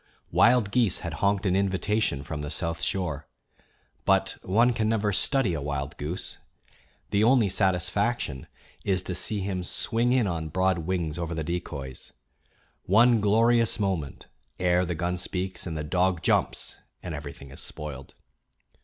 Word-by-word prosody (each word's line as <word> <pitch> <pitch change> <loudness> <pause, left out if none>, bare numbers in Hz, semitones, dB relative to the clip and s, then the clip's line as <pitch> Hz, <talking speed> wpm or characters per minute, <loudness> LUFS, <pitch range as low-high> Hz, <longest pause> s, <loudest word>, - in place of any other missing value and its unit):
Wild 120 -4 +4
geese 115 -6 +2
had 85 -2 -4
honked 100 0 +2
an 95 -1 +2
invitation 100 -5 +1
from 75 +1 -5
the 75 - -4
South 85 -1 -2
Shore; 75 -3 -2 0.8
but 95 0 +2
one 115 +6 +3
can 110 -1 0
never 105 -2 +1
study 135 -4 +2
a 75 - -3
wild 70 0 -3
goose; 80 +5 -4 0.7
the 100 +1 +3
only 115 -3 +4
satisfaction 95 - 0 0.4
is 95 -2 0
to 90 - -3
see 100 +5 0
him 95 -1 -2
swing 115 +6 0
in 125 -3 +3
on 80 -4 -2
broad 95 +2 +1
wings 85 -1 -2
over 85 0 -3
the 80 - -2
decoys 75 -6 -5 0.7
one 115 +3 +5
glorious 115 +3 +3
moment 95 -9 -2 0.3
ere 90 0 +3
the 90 0 -3
gun 90 +3 -1
speaks 90 +1 -3
and 80 -2 -4
the 75 - -3
dog 90 +2 +1
jumps - - 0 0.2
and 90 - -5
everything 70 -2 -8
is 70 - -9
spoiled. 70 -3 -7
90 Hz, 155 wpm, -27 LUFS, 80-105 Hz, 0.8 s, one